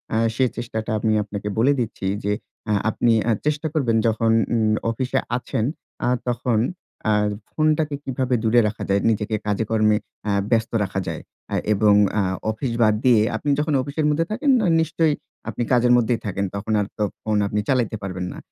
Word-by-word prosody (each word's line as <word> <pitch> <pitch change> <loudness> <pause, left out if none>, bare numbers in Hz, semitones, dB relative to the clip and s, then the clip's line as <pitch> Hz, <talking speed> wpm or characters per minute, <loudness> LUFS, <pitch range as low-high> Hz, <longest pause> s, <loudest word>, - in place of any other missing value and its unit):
আ - - +2 0.2
সে 130 - +3
চেষ্টাটা 110 -2 -4
আমি 110 0 +1
আপনাকে 100 0 -6
বলে 125 +6 +4
দিচ্ছি 110 -5 -3 0.2
যে, 100 +1 +1 0.4
আ - - +3 0.2
আপনি 120 +1 +2 0.2
আ - - +4
চেষ্টা 150 +1 0
করবেন 125 -8 +1
যখন 115 0 +2 0.2
উ - - +3 0.3
অফিসে 125 +2 -1 0.2
আছেন 115 -3 -2 0.4
আ - - +1 0.2
তখন 120 -1 0 0.5
আ - - +4 0.4
ফোনটাকে 155 -1 +1
কিভাবে 130 -1 -1
দূরে 115 +2 +4
রাখা 105 +1 -4
যায়, 100 +1 +2
নিজেকে 110 0 0
কাজে 105 +1 0
কর্মে 110 -1 +3 0.3
আ - - +2 0.2
ব্যস্ত 115 -1 +1
রাখা 95 -1 -3
যায়। 80 -1 -4 0.3
আ - - +2 0.2
এবং 105 0 +4 0.3
আ - - +3 0.3
অফিস 115 +3 -3
বাদ 110 -2 +5
দিয়ে 120 -4 +6
আপনি 145 - -2
যখন 150 0 0
অফিসের 145 +3 -2
মধ্যে 155 +3 +1
থাকেন 280 +7 0
ন - - 0 0.2
নিশ্চয়ই 160 -1 +1 0.4
আপনি 120 - -2
কাজের 125 -1 +4
মধ্যেই 120 0 +1
থাকেন। 100 -1 -1
তখন 100 +2 -2
আর 100 - -1
তো 105 - 0 0.2
ফোন 110 -1 0
আপনি 105 +1 -1
চালাইতে 120 -5 +1
পারবেন 90 -2 -4
না। - - -10
115 Hz, 185 wpm, -22 LUFS, 105-130 Hz, 0.5 s, দিয়ে